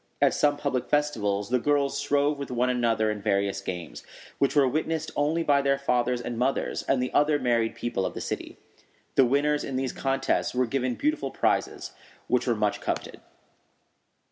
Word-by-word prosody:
At -, -, +4 dB
some 145 Hz, -1 st, +2 dB
public 130 Hz, -4 st, -2 dB
festivals 110 Hz, -9 st, 0 dB
the 125 Hz, -, +3 dB
girls 140 Hz, +1 st, +1 dB
strove 145 Hz, 0 st, +1 dB
with 140 Hz, -, -5 dB
one 125 Hz, 0 st, +1 dB
another 115 Hz, -3 st, +1 dB
in 105 Hz, -1 st, -5 dB
various 100 Hz, -1 st, 0 dB
games, 90 Hz, -4 st, -6 dB, 0.4 s
which 140 Hz, -, +2 dB
were 140 Hz, -2 st, +5 dB
witnessed 160 Hz, +3 st, -2 dB
only 155 Hz, +3 st, +1 dB
by 140 Hz, -2 st, +3 dB
their 140 Hz, 0 st, +2 dB
fathers 125 Hz, -2 st, 0 dB
and 120 Hz, -1 st, -5 dB
mothers 130 Hz, +2 st, 0 dB
and 130 Hz, -2 st, +1 dB
the 125 Hz, -, -4 dB
other 150 Hz, +1 st, +3 dB
married 120 Hz, -4 st, +1 dB
people 120 Hz, -5 st, -2 dB
of -, -, -3 dB
the -, -, -4 dB
city. -, -, -5 dB, 0.6 s
The 135 Hz, -, +5 dB
winners 145 Hz, +3 st, +1 dB
in 135 Hz, -, -4 dB
these 130 Hz, 0 st, -1 dB
contests 135 Hz, -1 st, 0 dB
were 130 Hz, 0 st, +2 dB
given 125 Hz, 0 st, -1 dB
beautiful 305 Hz, +2 st, -1 dB
prizes, -, -, -1 dB, 0.4 s
which -, -, +1 dB
were -, -, +2 dB
much -, -, 0 dB
coveted. -, -, -4 dB
130 Hz, 180 wpm, -26 LUFS, 120-145 Hz, 0.6 s, were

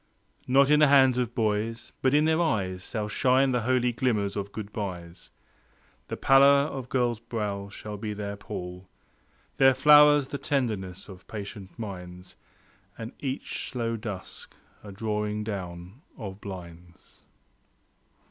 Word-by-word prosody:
Not 135 Hz, +2 st, +4 dB
in 150 Hz, -, +6 dB
the 150 Hz, -, +6 dB
hands 130 Hz, -3 st, +5 dB
of 120 Hz, -1 st, -2 dB
boys, 115 Hz, 0 st, -1 dB
but 130 Hz, +1 st, +3 dB
in 150 Hz, +1 st, +4 dB
their 160 Hz, +1 st, +2 dB
eyes 95 Hz, -, -1 dB
Shall 105 Hz, -2 st, -2 dB
shine 130 Hz, +5 st, +2 dB
the 125 Hz, -1 st, +1 dB
holy 125 Hz, +1 st, +1 dB
glimmers 110 Hz, -5 st, 0 dB
of 100 Hz, -1 st, -4 dB
goodbyes. 95 Hz, -5 st, -6 dB, 0.8 s
The -, -, -5 dB
pallor 140 Hz, +1 st, +6 dB
of 130 Hz, -2 st, -6 dB
girls' 120 Hz, -3 st, 0 dB
brows 100 Hz, -4 st, -4 dB
shall 105 Hz, -1 st, -7 dB
be 105 Hz, +1 st, -4 dB
their 100 Hz, 0 st, -4 dB
pall; 90 Hz, -2 st, -8 dB, 0.7 s
Their 135 Hz, -1 st, +6 dB
flowers 145 Hz, 0 st, +6 dB
the 140 Hz, -, -4 dB
tenderness 110 Hz, -10 st, -2 dB
of 95 Hz, -3 st, -13 dB
patient 100 Hz, -2 st, -8 dB
minds, 90 Hz, -4 st, -8 dB, 0.6 s
And 115 Hz, +1 st, -6 dB
each 135 Hz, -1 st, -4 dB
slow 115 Hz, -2 st, -2 dB
dusk 105 Hz, -4 st, -8 dB, 0.3 s
a 105 Hz, -, -9 dB
drawing 105 Hz, +1 st, -2 dB
down 95 Hz, +1 st, -7 dB, 0.2 s
of 100 Hz, -3 st, -8 dB
blinds. 85 Hz, -3 st, -11 dB
110 Hz, 140 wpm, -27 LUFS, 100-130 Hz, 0.8 s, in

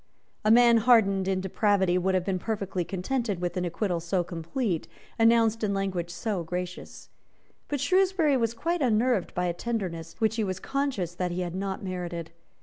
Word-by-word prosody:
A 215 Hz, -, +2 dB
man 235 Hz, +1 st, +7 dB
hardened 210 Hz, -5 st, +4 dB
in 190 Hz, -1 st, 0 dB
depravity 190 Hz, -1 st, +2 dB
would 185 Hz, +1 st, +1 dB
have 180 Hz, -1 st, 0 dB
been 190 Hz, -2 st, -1 dB
perfectly 195 Hz, -4 st, -2 dB
contented 200 Hz, +3 st, -2 dB
with 175 Hz, -1 st, -2 dB
an 180 Hz, -1 st, -1 dB
acquittal 175 Hz, 0 st, -1 dB
so 175 Hz, +2 st, 0 dB
complete, 170 Hz, +3 st, -3 dB, 0.3 s
announced 225 Hz, -1 st, +4 dB
in 200 Hz, -2 st, +1 dB
language 185 Hz, -3 st, -2 dB
so 180 Hz, +2 st, -3 dB
gracious. 180 Hz, +2 st, -6 dB, 0.6 s
But 290 Hz, -, -2 dB
Shrewsbury 365 Hz, 0 st, +3 dB
was 230 Hz, -2 st, 0 dB
quite 340 Hz, +6 st, -1 dB
unnerved 235 Hz, -4 st, +1 dB
by 180 Hz, -, 0 dB
a 175 Hz, -, 0 dB
tenderness 175 Hz, -6 st, -4 dB
which 220 Hz, 0 st, +1 dB
he 220 Hz, -, +1 dB
was 190 Hz, -2 st, -3 dB
conscious 265 Hz, -, -2 dB
that 180 Hz, 0 st, -2 dB
he 175 Hz, +1 st, -3 dB
had 175 Hz, -1 st, -3 dB
not 190 Hz, +1 st, -3 dB
merited. 175 Hz, -3 st, -5 dB
195 Hz, 175 wpm, -27 LUFS, 180-230 Hz, 0.6 s, man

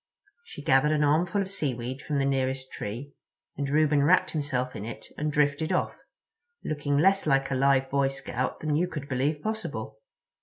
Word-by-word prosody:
She 145 Hz, -, -10 dB
gathered 140 Hz, +2 st, +4 dB
an 150 Hz, -1 st, +2 dB
armful 175 Hz, +7 st, +2 dB
of 190 Hz, -, -8 dB
seaweed 130 Hz, -6 st, -3 dB
from 150 Hz, -1 st, -2 dB
the 135 Hz, -, +2 dB
nearest 130 Hz, -1 st, -1 dB
tree, 120 Hz, +8 st, -6 dB, 0.4 s
and 140 Hz, -1 st, -2 dB
Reuben 150 Hz, 0 st, +3 dB
wrapped 175 Hz, +6 st, +4 dB
himself 130 Hz, -5 st, -2 dB
in 100 Hz, -, -5 dB
it 115 Hz, +1 st, -7 dB
and 150 Hz, 0 st, -2 dB
drifted 150 Hz, +2 st, +1 dB
off—looking 180 Hz, -, -4 dB
less 195 Hz, +3 st, +3 dB
like 135 Hz, -1 st, +2 dB
a -, -, +1 dB
live 135 Hz, 0 st, +3 dB
Boy 140 Hz, 0 st, +3 dB
Scout 135 Hz, -2 st, -3 dB
than 150 Hz, -1 st, 0 dB
you 175 Hz, +4 st, +2 dB
could 150 Hz, -5 st, -6 dB
believe 145 Hz, +3 st, -1 dB
possible. 115 Hz, -, -4 dB
145 Hz, 175 wpm, -27 LUFS, 135-155 Hz, 0.4 s, gathered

